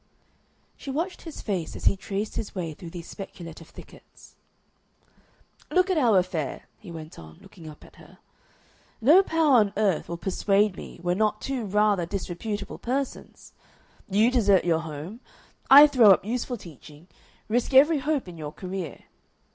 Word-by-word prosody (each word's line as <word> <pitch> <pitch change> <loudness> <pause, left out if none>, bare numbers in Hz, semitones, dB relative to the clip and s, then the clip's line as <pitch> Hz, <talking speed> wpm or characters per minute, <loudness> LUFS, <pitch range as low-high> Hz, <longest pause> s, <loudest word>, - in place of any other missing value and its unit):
She - - -9
watched 330 +7 -3
his 325 -3 -9
face 185 -6 -3
as - - -8
he - - +4
traced 200 +2 -5
his 205 - -5
way 170 -4 -4
through 170 +3 -10
these 170 0 -9
speculative 170 -4 -10
thickets. - - -16 1.3
"Look 365 +1 +2
at 365 - +1
our 230 -7 +4
affair," 170 -7 -2 0.2
he - - -13
went 160 -1 -10
on, 80 -1 -13
looking 165 -4 -13
up 150 - -14
at - - -19
her. - - -17 0.8
"No 300 - +6
power 320 -7 +3
on 205 -3 +2
earth 200 -7 0
will 170 - -4
persuade 200 +2 +1
me - - -10
we're 175 0 +1
not 210 +2 0
two 260 -3 -4
rather 205 -3 +1
disreputable 200 +2 -5
persons. 270 +2 -5 0.6
You 215 +5 +3
desert 205 -8 +3
your 165 -2 +2
home; 160 +7 -8 0.5
I 285 +2 +11
throw 255 -7 +5
up 190 - +5
useful 245 +2 -3
teaching, 155 - -14 0.4
risk 240 +4 0
every 290 +4 +5
hope 290 -4 -1
in 170 -2 -10
your 150 -1 -6
career. 185 -4 -7
200 Hz, 160 wpm, -25 LUFS, 170-245 Hz, 1.3 s, I